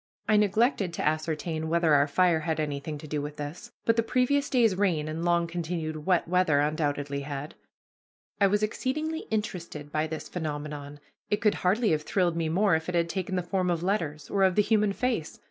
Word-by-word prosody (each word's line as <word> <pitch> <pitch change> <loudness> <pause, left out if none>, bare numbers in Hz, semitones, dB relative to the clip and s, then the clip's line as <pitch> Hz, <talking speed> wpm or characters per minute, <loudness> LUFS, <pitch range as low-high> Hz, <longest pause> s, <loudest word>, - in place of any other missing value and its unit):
I 215 - +4
neglected 210 -2 +2
to - - -1
ascertain 155 +1 -1
whether 165 -2 +3
our 145 0 +5
fire 175 +1 +3
had 160 0 -2
anything 150 0 -3
to 155 - -10
do 150 0 -2
with 150 +1 -6
this, 150 +11 -7
but 230 0 +3
the - - +5
previous 255 +5 +1
day's 235 -6 +4
rain 175 -6 +1
and 160 +2 -4
long 170 0 +2
continued 165 -2 -4
wet 180 -3 +3
weather 180 -5 +3
undoubtedly 145 -2 -1
had. 140 +1 -5 0.9
I 200 - +5
was 205 +2 +1
exceedingly 305 +9 -2
interested 170 -9 -4
by 155 +1 0
this 160 0 -6
phenomenon. 145 -3 -5 0.3
It 210 - +1
could 210 -1 +3
hardly 205 +4 +2
have 155 -1 +1
thrilled 175 +1 0
me 165 -1 -1
more 195 +4 +3
if 160 +2 -2
it 180 - -2
had 170 0 +1
taken 190 +1 -2
the 180 - 0
form 185 0 0
of 170 -1 0
letters, 160 -7 -1
or 200 - -1
of 190 -2 +4
the 210 - +4
human 210 -1 +2
face. 225 -7 -2
170 Hz, 200 wpm, -28 LUFS, 155-200 Hz, 0.9 s, our